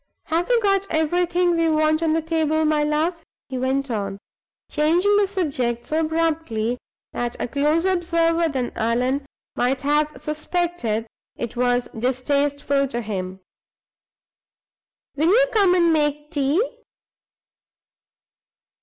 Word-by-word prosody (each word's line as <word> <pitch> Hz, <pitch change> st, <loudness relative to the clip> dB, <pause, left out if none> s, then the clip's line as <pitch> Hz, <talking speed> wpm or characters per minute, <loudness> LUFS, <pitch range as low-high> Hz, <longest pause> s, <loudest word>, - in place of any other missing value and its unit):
Have 340 Hz, +4 st, -1 dB
we 485 Hz, -1 st, +4 dB
got 395 Hz, -1 st, +2 dB
everything 350 Hz, +2 st, +1 dB
we 330 Hz, -1 st, +2 dB
want 310 Hz, 0 st, +2 dB
on 320 Hz, -1 st, +2 dB
the 325 Hz, 0 st, 0 dB
table, 315 Hz, -1 st, +1 dB
my 305 Hz, -1 st, +2 dB
love?" 320 Hz, +3 st, 0 dB, 0.3 s
he 260 Hz, -1 st, -3 dB
went 265 Hz, +1 st, -1 dB
on, 200 Hz, -3 st, -3 dB, 0.5 s
changing 345 Hz, +7 st, +2 dB
the 410 Hz, -1 st, +3 dB
subject 270 Hz, -, -1 dB
so 310 Hz, -, -1 dB
abruptly 310 Hz, -8 st, -1 dB, 0.3 s
that 240 Hz, 0 st, -3 dB
a -, -, -2 dB
closer 300 Hz, +7 st, +1 dB
observer 335 Hz, -2 st, +1 dB
than 260 Hz, -4 st, -2 dB
Allan 250 Hz, +5 st, 0 dB, 0.3 s
might 255 Hz, +2 st, 0 dB
have 295 Hz, +1 st, +2 dB
suspected 305 Hz, -7 st, -2 dB, 0.3 s
it 235 Hz, 0 st, -5 dB
was 245 Hz, 0 st, +1 dB
distasteful 275 Hz, +3 st, 0 dB
to 240 Hz, -2 st, -3 dB
him. 190 Hz, -3 st, -5 dB, 1.7 s
"Will 305 Hz, +3 st, +1 dB
you -, -, +5 dB
come 395 Hz, -5 st, +4 dB
and 340 Hz, -2 st, +4 dB
make 295 Hz, -1 st, 0 dB
tea?" 285 Hz, +3 st, +1 dB
300 Hz, 125 wpm, -22 LUFS, 255-335 Hz, 1.7 s, you